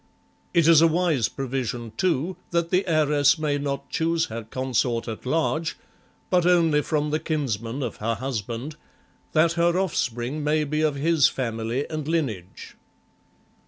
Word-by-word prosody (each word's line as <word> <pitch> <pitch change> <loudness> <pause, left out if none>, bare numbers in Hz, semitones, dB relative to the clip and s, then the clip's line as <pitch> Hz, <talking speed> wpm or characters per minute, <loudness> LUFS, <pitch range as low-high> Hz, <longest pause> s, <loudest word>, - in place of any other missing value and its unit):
It 170 -2 +3
is 165 -2 +7
a 165 - +7
wise 160 -8 +1
provision, 125 -4 -4
too, 175 +3 0
that 170 -1 0
the 190 +1 +2
heiress 150 -2 +3
may 150 -2 -1
not 140 -1 -4
choose 165 -1 +1
her 115 - -4
consort 120 0 -1
at 115 +2 -6
large, 160 +2 0 0.5
but 180 -1 +4
only 165 -4 +4
from 150 0 -1
the 155 - +1
kinsmen 135 -5 -2
of 120 - -4
her 115 +2 -1
husband, 120 +4 -4 0.6
that 160 +1 +4
her 170 +1 +2
offspring 140 -6 -1
may 150 +1 +2
be 150 +1 -1
of 155 -2 +1
his 155 0 +3
family 115 +1 -2
and 155 -2 -5
lineage. 120 - -3
150 Hz, 150 wpm, -24 LUFS, 125-165 Hz, 0.6 s, is